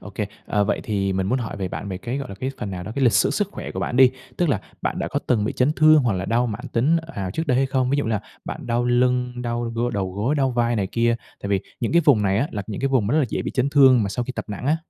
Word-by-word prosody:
Ô 105 - -10
kê. 105 +1 -3 0.2
À, 105 -1 +1
vậy - - 0
thì 100 -3 -1
mình 95 0 -1
muốn 125 +6 +1
hỏi 115 -4 -5
về 95 -2 -3
bạn 100 - -6
về 95 -2 -4
cái, 120 +7 -4
gọi 135 - -5
là, 100 - -7
cái 130 +7 -3
phần 105 - -4
nào 90 -2 -5
đó 95 - -6
cái 140 - +1
lịch 120 - +5
sử - - +3
sức 205 -2 0
khỏe - - -6
của - - -5
bạn 125 - -2
đi. 130 -1 +7 0.3
Tức 175 - +1
là 125 -9 +1 0.2
bạn - - -1
đã - - -2
có - - -1
từng 110 -4 +2
bị 110 - -1
chấn 130 +4 +2
thương 155 -2 +6
hoặc 120 -4 +1
là 95 +1 -2
đau 120 +4 +1
mãn 105 -3 -5
tính, 140 +8 +2
ờ, 165 0 -11
ào 95 -2 -3
trước 160 - -3
đây 125 -3 +2
hay 135 - +3
không? 130 -1 0
Ví 140 - +2
dụ 145 - 0
như 110 - -2
là 110 -2 0 0.2
bạn - - -6
đau 120 +1 0
lưng, 125 0 +1
đau 120 0 -2
gô 120 +1 0
đầu 95 -4 -2
gối, 110 +9 0
đau 135 -2 +1
vai 120 -1 +1
này 100 -3 0
kia 115 +3 +1 0.3
tại 100 - -3
vì 100 -1 +1 0.2
những 115 - -1
cái 170 0 +5
vùng 130 -9 +5
này 100 0 +2
á 140 +6 0
là 105 -2 -3
những 105 - -5
cái 135 - +1
vùng 130 -7 +2
rất 150 +6 +2
là 145 - +3
dễ - - -2
bị - - -3
chấn 135 +1 0
thương 130 -5 +6
mà 100 - -1
sau 120 +5 -2
khi 130 - -5
tập - - -5
nặng 105 +5 -5
á. 155 +3 +3
120 Hz, 340 wpm, -23 LUFS, 100-135 Hz, 0.3 s, đi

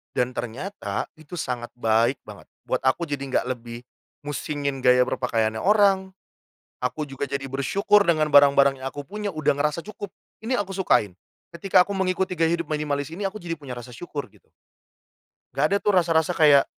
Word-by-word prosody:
dan 125 0 +1
ternyata, 120 - -4
itu 155 +3 -10
sangat 125 -6 -4
baik 115 +2 +2
banget, - - -12 0.2
buat - - 0
aku. 150 +6 +2
Jadi 140 -1 -3
nggak 125 - +1
lebih 120 -1 -7 0.4
musingin 145 -1 -3
gaya 125 0 +6
berpakaiannya 110 -4 -1
orang, 195 -2 +3 0.7
aku 150 +3 -2
juga 135 +1 -4
jadi 135 0 -4
bersyukur 200 +10 +2
dengan 155 -3 +2
barang-barang 140 -1 +6
yang - - -4
aku 145 - -6
punya, 205 0 -4
udah 155 -2 +1
ngerasa 150 +3 0
cukup, 205 -2 -8 0.3
ini 250 - -2
aku 200 -1 -3
sukain, 105 - +2 0.4
ketika 180 +1 +4
aku 200 - -9
mengikuti 185 -1 0
gaya 165 +1 +3
hidup 170 -3 -3
minimalis 145 -2 -2
ini, 195 +5 -6
aku 215 +2 -6
jadi 165 -1 -4
punya 135 -4 -7
rasa 120 +1 -9
syukur, 145 +3 -6
gitu. - - -25 1.1
Nggak - - +2
ada 200 - +4
tuh 210 - +1
rasa-rasa 165 -1 +3
kayak, 145 -3 +6
145 Hz, 170 wpm, -24 LUFS, 130-180 Hz, 1.1 s, gaya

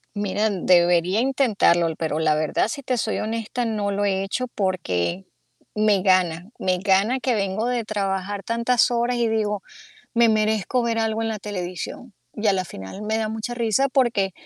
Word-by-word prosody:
Mira, 205 +1 0
debería 175 0 +3
intentarlo, 230 -10 +2
l 160 - -3
pero 155 -2 -2
la 155 -1 +2
verdad, 155 +6 0
si 280 +5 -5
te 255 -1 -1
soy 220 -1 -1
honesta, 225 +2 -3
no 210 -3 -1
lo 205 +1 0
he 195 -1 0
hecho 255 +6 -2
porque 185 - -2 0.5
me 210 -3 +2
gana. 185 -2 +2
Me 185 -1 +1
gana 200 +6 +2
que 255 -1 0
vengo 200 +1 -1
de 245 -2 -1
trabajar 200 -1 -3
tantas 235 +1 +2
horas 240 +1 +1
y 235 -1 +1
digo: 210 -2 -1 0.5
"Me 235 0 +5
merezco 220 +2 +1
ver 230 -1 0
algo 220 0 0
en 225 - -1
la 215 -1 -4
televisión". 195 +3 -6 0.2
Y 215 0 -2
a 200 - +5
la 185 -1 -1
final 95 - -9
me 215 +1 -1
da 220 -1 -1
mucha 220 +2 -4
risa 240 +3 +1
porque 235 -8 +1
210 Hz, 185 wpm, -23 LUFS, 185-230 Hz, 0.5 s, Me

